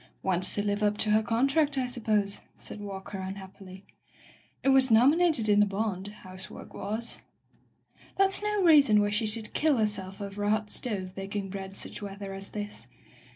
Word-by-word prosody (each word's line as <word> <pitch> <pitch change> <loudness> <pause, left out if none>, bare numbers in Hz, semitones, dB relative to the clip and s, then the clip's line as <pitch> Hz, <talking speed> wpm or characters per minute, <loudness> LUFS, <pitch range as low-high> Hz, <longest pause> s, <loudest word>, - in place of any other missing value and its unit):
'' - - -40
"Wants 185 -1 +2
to 205 - 0
live 205 0 0
up 210 0 +2
to 215 - 0
her 215 +1 +4
contract, 275 +6 +1
I 260 - +1
sup 245 -2 -7
pose/' 205 -2 +1 0.2
said - - -8
Walker 195 -1 -7
unhappily. 190 0 -9 0.8
"It 270 - +3
was 265 -1 +5
nom 240 +6 +6
inated 320 -10 +2
in 205 -1 +4
the 210 - +6
bond 200 -1 -3
— - - -17
^housework 185 0 -9
was." 220 +4 -4 1.0
"That's 390 0 +5
no 420 -1 0
reason 290 -11 +6
why 205 0 +1
she 215 +1 +1
should 215 0 -1
kill 305 -3 +2
herself 200 -3 -2
over 200 0 -5
a 205 - +1
hot 215 0 0
stove 190 -7 -2
baking 195 0 -5
bread 195 0 -6
such - - -4
weather 200 -1 -6
as 195 +1 -6
this. 205 - -7
210 Hz, 190 wpm, -28 LUFS, 195-235 Hz, 1.0 s, nom